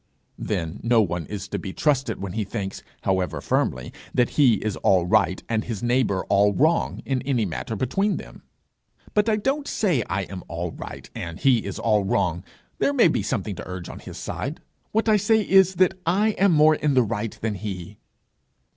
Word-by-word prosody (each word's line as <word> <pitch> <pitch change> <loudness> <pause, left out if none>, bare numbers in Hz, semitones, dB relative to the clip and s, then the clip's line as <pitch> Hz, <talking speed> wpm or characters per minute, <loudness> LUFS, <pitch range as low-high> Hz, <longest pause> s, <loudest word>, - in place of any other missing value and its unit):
'Then 80 -1 -3
no 115 0 +3
one 85 -6 0
is 100 -1 -5
to - - -3
be 95 - -6
trusted 135 -2 0
when 95 -2 -5
he 110 0 -1
thinks, 100 -1 -5 0.2
however 95 -1 0
firmly, 65 0 -1 0.2
that 125 - +2
he 130 -6 +5
is 105 0 -3
all 95 -3 +3
right, 95 -1 +2
and 110 -1 -1
his 115 -2 -5
neighbour 120 -6 +1
all 100 +1 +4
wrong, 160 +4 +1
in 130 -2 -1
any 125 -5 0
matter 95 +5 -4
between 195 - 0
them.' - - -10 0.7
'But 210 +1 +3
I 215 - +3
don't 275 +7 -1
say 175 - +1
I 95 +2 -1
am 95 -1 -8
all 85 +1 -4
right, - - -9
and 80 -1 -6
he 130 -4 +4
is 100 - -5
all 105 -3 +2
wrong; 90 -3 0 0.4
there 285 - +2
may 240 -10 +5
be 155 - 0
something 105 +1 -2
to - - -7
urge 90 -2 -6
on - - -8
his - - -10
side: - - -4 0.3
what 220 +1 +1
I 215 -1 +5
say 215 +1 +3
is, 190 -1 +5
that 185 +1 +4
I 195 +6 +2
am 200 -2 +3
more 155 -1 +6
in 150 -2 0
the 125 - +5
right 115 -1 -3
than 110 -1 -1
he.' 100 -1 -6
115 Hz, 200 wpm, -24 LUFS, 95-155 Hz, 0.7 s, more